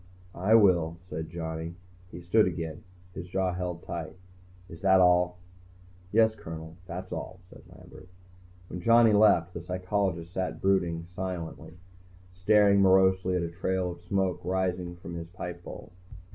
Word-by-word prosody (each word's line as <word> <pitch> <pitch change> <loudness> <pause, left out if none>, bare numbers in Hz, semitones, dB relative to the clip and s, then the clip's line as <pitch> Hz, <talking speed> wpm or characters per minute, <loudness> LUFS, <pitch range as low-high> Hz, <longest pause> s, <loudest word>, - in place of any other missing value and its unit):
"I 100 +5 +3
will," 85 -6 +4
said 80 -2 -6
Johnny. 80 0 -5 0.3
He 90 - -9
stood 95 +4 +3
again, 80 -3 -5 0.3
his 85 - -7
jaw 95 0 -1
held 90 -1 -4
tight. 85 -2 -6 0.5
"Is 80 -2 -12
that 95 -1 +5
all?" 90 0 +4 0.7
"Yes, 110 0 +4
Colonel, 80 -3 -9
that's 90 +2 -7
all," 95 -1 -6
said - - -14
Lambert. 90 - -15 0.6
When 90 - -7
Johnny 115 +2 +5
left, 95 -5 +4
the 85 - -6
psychologist 90 -1 -2
sat 90 -4 -2
in - - -13
brooding 85 -3 0
silence, 90 -2 -6 0.5
staring 100 +2 +4
morosely 95 -1 +4
at 90 - 0
a 85 - -4
trail 90 +1 -1
of 85 - -9
blue 90 - -24
smoke 95 -1 0
rising 90 -1 -2
from 85 0 -9
his 85 -1 -6
pipe 90 -1 -7
bowl. - - -10
90 Hz, 155 wpm, -28 LUFS, 85-95 Hz, 0.7 s, that